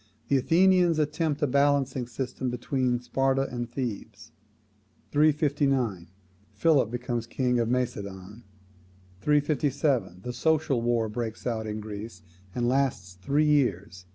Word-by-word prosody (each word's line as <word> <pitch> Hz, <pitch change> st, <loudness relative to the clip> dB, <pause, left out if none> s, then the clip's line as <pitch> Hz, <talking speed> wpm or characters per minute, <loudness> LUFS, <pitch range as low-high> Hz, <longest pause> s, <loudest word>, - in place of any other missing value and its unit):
The 140 Hz, -, +4 dB
Athenians 175 Hz, +3 st, +4 dB
attempt 150 Hz, 0 st, -1 dB
a -, -, +5 dB
balancing 140 Hz, -2 st, +1 dB
system 125 Hz, +1 st, -4 dB
between 125 Hz, 0 st, -1 dB
Sparta 135 Hz, +2 st, +1 dB
and 120 Hz, -1 st, -4 dB
Thebes. 110 Hz, -4 st, -6 dB, 0.8 s
359. 140 Hz, -, +1 dB, 0.5 s
Philip 130 Hz, +1 st, +3 dB
becomes 120 Hz, -1 st, -3 dB
king 125 Hz, -1 st, 0 dB
of 115 Hz, -1 st, 0 dB
Macedon. 105 Hz, -4 st, -3 dB, 0.8 s
357. 140 Hz, -, +1 dB
The 125 Hz, -, -4 dB
Social 150 Hz, -1 st, +1 dB
War 120 Hz, -1 st, +1 dB
breaks 110 Hz, 0 st, -5 dB
out 110 Hz, -2 st, -2 dB
in 105 Hz, 0 st, -4 dB
Greece, 105 Hz, -3 st, -8 dB, 0.3 s
and 120 Hz, -1 st, 0 dB
lasts 125 Hz, -8 st, 0 dB
three 145 Hz, +9 st, +2 dB
years. 100 Hz, -10 st, 0 dB
125 Hz, 120 wpm, -27 LUFS, 110-145 Hz, 0.8 s, a